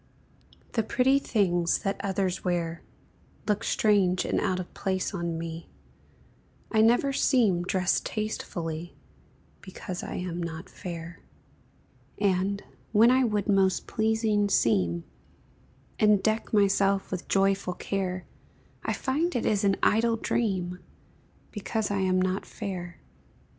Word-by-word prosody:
The 225 - +1
pretty 260 +5 +3
things 175 -9 +1
that 195 0 -2
others 190 -1 -1
wear 170 -2 -1 0.7
Look 210 +1 +1
strange 195 -6 +2
and - - 0
out 185 -3 0
of 180 - -7
place 190 +1 -2
on 170 -3 -2
me, 165 0 -6 1.0
I 220 - +4
never 240 +5 +4
seem 225 -11 +3
dressed 185 0 +1
tastefully, 175 -6 -4 0.7
Because 185 -1 -7
I - - -6
am 175 -1 -3
not 165 0 -6
fair; 170 -1 -7 1.0
And, 200 0 +1 0.3
when 230 +3 +6
I 260 +1 +4
would 210 -4 0
most 195 -2 +2
pleasing 220 -2 +1
seem, 90 - +2 1.0
And 210 -2 +4
deck 220 0 0
myself 200 -1 +2
with 185 -1 -4
joyful 195 -2 +1
care, 185 -1 -3 0.6
I - - -1
find 310 +6 -1
it 240 - 0
is 205 -2 +1
an 195 -1 +3
idle 230 +2 +3
dream, 185 -6 -1 0.7
Because 215 0 -2
I 200 - 0
am 185 -1 +2
not 185 +1 0
fair. 175 -3 -6
195 Hz, 125 wpm, -27 LUFS, 180-215 Hz, 1.0 s, when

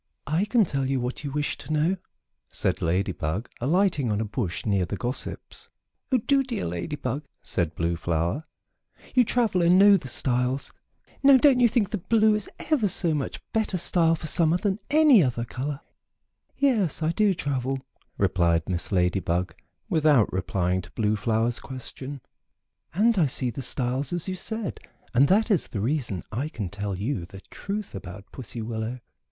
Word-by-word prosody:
"I 160 +7 +1
can 220 0 +3
tell 135 -4 -2
you 135 -1 +1
what 125 +4 -4
you 145 - -3
wish 145 +1 -2
to 140 - -8
know," 155 +5 +2 0.5
said - - -1
Lady 95 +4 +1
Bug, 85 +7 -3
alighting 150 - +2
on 105 - 0
a 110 - -1
bush 105 -4 -3
near 100 -4 +2
the 90 - -3
gossips. 125 +5 -4 0.4
"Oh, 260 - +5
do, 275 +4 +2
dear 250 -5 -3
Lady 85 - -3
Bug!" 135 +1 -3 0.2
said 85 -3 -1
Blue 85 +1 0
Flower. 85 - -1 0.7
"You 255 - +6
travel 225 -6 +1
and 175 +2 +5
know 200 +1 +7
the 150 - -8
styles. 125 +1 0 0.5
Now 275 -1 +8
don't 260 -1 +5
you 245 - +6
think 215 -3 0 0.2
blue 220 -1 +5
is 210 -1 -2 0.2
ever 260 -9 +3
so 175 -3 +1
much 145 -3 -3
better 220 -4 0
style 165 -1 +3
for 160 - -8
summer 165 +1 +3
than 195 +2 -1
any 295 -7 +6
other 120 -3 -1
color?" 140 +4 -4 0.8
"Yes, 215 - +1
I 155 - +2
do 205 +1 +2
travel," 135 -2 -2 0.4
replied 85 -2 +2
Miss 85 -2 -2
Lady 90 0 +2
Bug, 90 0 -1 0.3
without 150 - +3
replying 90 0 0
to 90 - -13
Blue 110 -1 +1
Flower's 115 +3 0
question, 130 +1 -7 0.7
"and 220 +2 +3
I 160 - +4
see 125 -1 -1
the 125 - -6
styles, 130 +2 -1
as 175 0 -2
you 190 - -2
said, 220 +3 -3 0.3
and 130 +3 +5
that 215 - +3
is 190 - +2
the 105 - -5
reason 115 - -1
I 130 +8 -2
can 105 - -5
tell 100 0 -4
you 105 +1 -2
the 95 +2 -12
truth 205 +1 -5
about 100 0 -8
Pussy 120 -2 -6
Willow. 110 +2 -4
135 Hz, 175 wpm, -26 LUFS, -, 0.8 s, Now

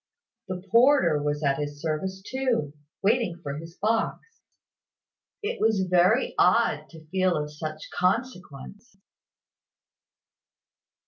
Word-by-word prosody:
The 185 -1 -5
porter 230 - +5
was 145 +1 -2
at 140 0 +1
his 145 0 -4
service 190 +5 -3
too, 250 - -1 0.3
waiting 210 -5 +1
for 140 -1 -4
his 165 +2 -11
box! 225 - -2 1.0
It 455 +4 -3
was 215 -4 +2
very 180 +8 +3
odd 180 -6 +3
to 160 -2 -14
feel 185 -1 +1
of 150 0 -4
such 155 +1 -6
consequence. 195 - -3
180 Hz, 110 wpm, -26 LUFS, 155-225 Hz, 1.0 s, porter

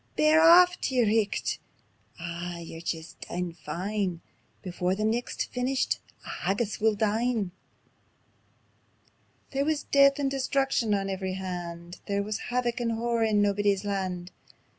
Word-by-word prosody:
Bear 310 +1 +5
aff 355 +2 +7
tae 265 - -1
yer 245 -2 +4
richt.... 215 -1 0 0.6
Aw 170 +1 -5
yer 165 -1 -8
jist 165 -1 -5
daein' 175 -1 -3
fine: 175 +3 -3 0.4
Before 180 0 -1
the 215 +2 -1
nicht's 230 +3 -1
feenished 255 +1 -1 0.3
on - - -6
haggis 200 +4 -1
we'll 220 0 +3
dine." 220 -1 0 2.0
There 275 0 0
wis 305 0 0
death 275 0 +5
and 275 -2 0
destruction 270 -5 +1
on 195 -1 -1
every 190 -1 -3
hand; 175 -2 -6
There 200 0 0
wis 210 +1 -3
havoc 245 0 0
and 230 -1 0
horror 230 0 +1
on 210 -1 +3
Naebuddy's 205 -1 +1
Land. 185 -3 -3
205 Hz, 140 wpm, -28 LUFS, 180-245 Hz, 2.0 s, aff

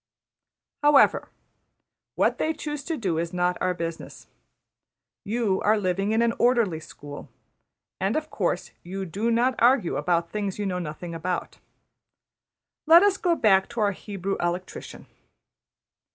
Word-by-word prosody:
However, 295 -1 +4 0.9
what - - +1
they 315 - 0
choose 295 -1 -5
to 325 -2 -2
do 180 - -1
is 170 +1 -3
not 180 0 +1
our 180 0 +1
business. 165 -1 -6 1.0
You 210 -3 0
are 215 +1 +3
living 195 +1 0
in 225 +1 +3
an 230 0 +2
orderly 235 -9 +2
school; 145 -2 -11 0.7
and 195 +3 0
of 310 0 -3
course 180 -2 -2
you 190 +2 -5
do 205 +7 -2
not 240 +3 +2
argue 240 -6 +3
about 170 -1 0
things 205 -3 -3
you 205 - -3
know 180 -2 -2
nothing 170 +1 -6
about. 175 +2 -4 1.3
Let 335 +3 +8
us 405 -1 +3
go 345 -2 +1
back 195 -8 +3
to 235 -1 -6
our 205 -1 +3
Hebrew 195 0 -4
electrician. 175 +1 -4
195 Hz, 140 wpm, -25 LUFS, 180-235 Hz, 1.3 s, Let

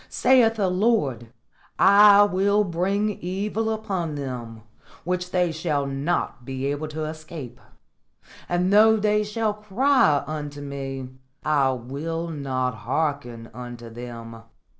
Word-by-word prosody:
Saith 245 -3 +4
the 205 -3 +1
Lord, 180 - 0 0.5
'I 205 0 +7
will 200 +1 +2
bring 195 +4 0
evil 205 +5 -2
upon 195 -8 -3
them, 120 -5 -6 0.4
which 180 +1 -2
they 180 -2 +1
shall 155 -3 -1
not 140 -1 -2
be 130 +1 -5
able 145 +2 -2
to 155 +1 -5
escape; 155 -5 -8 0.9
and 180 +2 +1
though 220 +1 +6
they 210 0 +2
shall 215 0 -1
cry 210 - +2
unto 145 -1 -6
Me, 135 -2 -5 0.4
I 140 -3 +2
will 150 +7 -4
not 130 -4 -2
hearken 125 -1 -3
unto 120 -2 -9
them.'" 115 -1 -9
155 Hz, 120 wpm, -24 LUFS, 135-200 Hz, 0.9 s, I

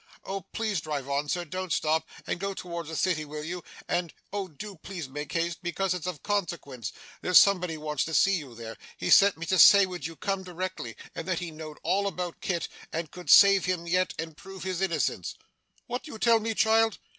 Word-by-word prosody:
'Oh 195 0 -3
please 215 -7 -1
drive 145 -3 -4
on, 140 +1 -1
sir 175 +2 -1
don't 185 +2 -5
stop 160 0 +1 0.2
and - - -2
go 195 +1 -3
towards 170 -3 -6
the 160 - -5
City, 165 -2 +1
will 150 0 -6
you? 175 +2 -5 0.2
And 175 -2 -1 0.2
oh 200 -2 -2
do 190 +4 -9
please 170 -2 -7
make 145 +3 -6
haste, 170 0 -1
because 185 +1 -1
it's 180 -1 -4
of 175 -6 -5
consequence. 170 - -2 0.3
There's 180 - +5
somebody 180 -5 +5
wants 150 -2 -1
to 160 - -3
see 195 0 +5
you 135 -7 -8
there. 115 -1 -8 0.2
He - - -2
sent 200 -2 +7
me 170 - -5
to 185 +1 +1
say 200 -1 +9
would 180 -3 -5
you 165 - -9
come 195 +3 -2
directly, 180 -9 -5 0.2
and - - -6
that 185 -2 0
he 175 -1 -4
knowed 155 -1 -9
all 195 +4 +1
about 180 -2 -4
Kit, 175 -3 -1 0.2
and 160 -2 -4
could 180 -1 -9
save 195 -1 +8
him 180 -2 -1
yet, 180 +2 +1
and 160 -1 -5
prove 195 +2 -10
his 185 -1 -2
innocence.' 155 - -1 0.5
'What 245 - -3
do 305 - -10
you - - -6
tell 230 0 +4
me, 225 0 -2
child? 225 0 +3
175 Hz, 215 wpm, -28 LUFS, 155-195 Hz, 0.5 s, say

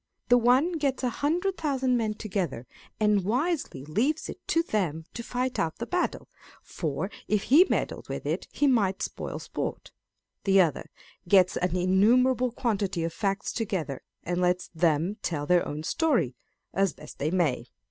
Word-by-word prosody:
The 245 - +7
one 265 +9 +3
gets 275 -3 -1
a 250 - +1
hundred 355 - 0
thousand 265 -5 +1
men 220 -3 0
together, 185 - -3 0.3
and 210 -2 +3
wisely 250 - -1
leaves 255 - 0
it - - -7
to 330 - +2
them 170 - -1
to 235 - -5
fight 250 +2 -2
out 160 -1 -1
the 235 - -4
battle, 360 +6 -1 0.4
for 165 +5 -3 0.2
if 210 -1 +1
he 330 +9 +6
meddled - - -2
with - - -5
it, - - -2
he 290 - +1
might 210 -8 +2
spoil - - -4
sport: - - -5 0.5
the 195 -1 +4
other 165 -6 +1 0.4
gets 185 -1 +5
an 180 0 0
innumerable 240 +8 +3
quantity 200 -7 -1
of 165 0 -2
facts 195 +1 -2
together, 180 - -3 0.2
and 180 +1 -1
lets 180 0 +1
them 165 +3 +1
tell 150 -4 -2
their 175 +3 +3
own 150 +1 -5
story, 210 - +1 0.4
as 195 -3 +2
best - - -13
they 150 - 0
may. 155 -9 0
200 Hz, 165 wpm, -27 LUFS, 175-255 Hz, 0.5 s, The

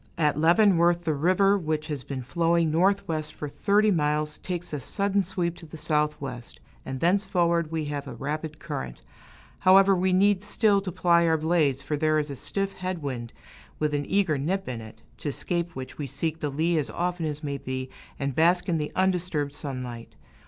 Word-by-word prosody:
At 150 -3 +2
Leavenworth, 175 +1 +4
the 160 - +1
river, 185 +7 +3
which 155 -2 -2
has 145 -4 -4
been 130 -1 -5
flowing 165 +3 +1
northwest 170 -3 +1
for 150 - -5
thirty 210 +7 +2
miles, 150 -2 0
takes 180 -2 -5
a 150 - -2
sudden 200 - 0
sweep 180 -2 -2
to 165 - -12
the 155 - -10
southwest, 150 -5 -2 0.2
and 130 0 -5
thenceforward 170 -2 +2
we 160 -2 -2
have 145 -1 -4
a - - -7
rapid 150 +2 -4
current. 65 -2 -6 0.6
However, 195 +1 +6
we 185 +1 +1
need 195 +1 +4
still 205 -1 +2
to 190 -2 -4
ply 170 0 +3
our 160 0 +3
blades, 155 -4 +1
for 150 +1 -2
there 155 +1 +2
is 150 -1 -1
a - - -5
stiff 195 +8 -3
head 185 -3 -3
wind, 120 -4 -4 0.5
with 150 -1 0
an 145 -1 -1
eager 185 -8 +1
nip 190 +7 -1
in 120 -3 -4
it, 110 +1 -13 0.2
to 145 - -3
escape 170 +4 -2
which 130 +2 -8
we 145 - -3
seek 160 +4 -2
the 150 - -2
lee 160 +4 +1
as 145 - -2
often 175 -2 -2
as 150 0 -5
may 140 -1 -3
be, 130 0 -4 0.3
and 140 0 -2
bask 175 +5 +3
in 165 -3 +1
the 150 - -3
undisturbed 180 -6 0
sunlight. 125 -5 -6
160 Hz, 190 wpm, -26 LUFS, 145-180 Hz, 0.6 s, However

